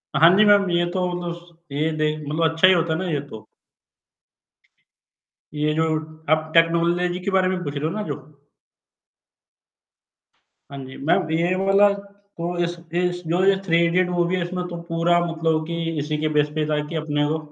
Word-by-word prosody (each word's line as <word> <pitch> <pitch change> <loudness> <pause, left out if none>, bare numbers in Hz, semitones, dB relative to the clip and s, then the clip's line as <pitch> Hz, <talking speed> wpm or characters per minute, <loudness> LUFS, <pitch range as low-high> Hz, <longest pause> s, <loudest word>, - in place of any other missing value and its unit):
हाँ 165 +1 +7
जी, 210 - +6
मैम 205 -2 +4
ये 175 0 +2
तो 185 0 -1
मतलब 175 -1 -4
सु 170 -1 -18 0.2
ये 155 +2 0
देख 155 0 0
मतलब 160 +2 +1
अच्छा 165 +3 +4
ही 190 - +6
होता 165 -2 +1
है 160 - -2
ना 185 - -3
ये 150 - 0
तो। 110 - -9 2.1
ये 150 +1 0
जो 160 +1 +1 0.5
आप 155 0 +1
टेक्नोलॉजी 170 +2 +2
के 200 - 0
बारे 190 -1 +3
में 185 -1 -2
पूछ 145 -2 -5
रहे 145 +1 -2
हो - - +1
ना 215 - -3
जो? 145 0 -9 2.3
हाँ 140 - -7
जी, 130 - -11
मैम 155 +1 +1
ये 170 +3 +1
वाला 195 +2 +4 0.5
तो 175 +1 -3
इस 175 0 -2 0.3
इस 180 0 -1
जो 175 +3 +1
ये 195 0 +5
थ्री 165 -3 +3
इडियट 180 +2 +1
मूवी 175 0 0
है 185 - -1
इसमें 180 0 -4
तो 170 -1 -7
पूरा 170 +1 +2
मतलब 165 -1 -1
कि 170 - -3 0.2
इसी 150 +1 -2
के 155 - +1
बेस 150 0 +3
पे 155 -1 0
था 150 -1 +1
कि 165 - -7
अपने 150 -2 -1
वो 155 +2 0
170 Hz, 190 wpm, -22 LUFS, 155-180 Hz, 2.3 s, हाँ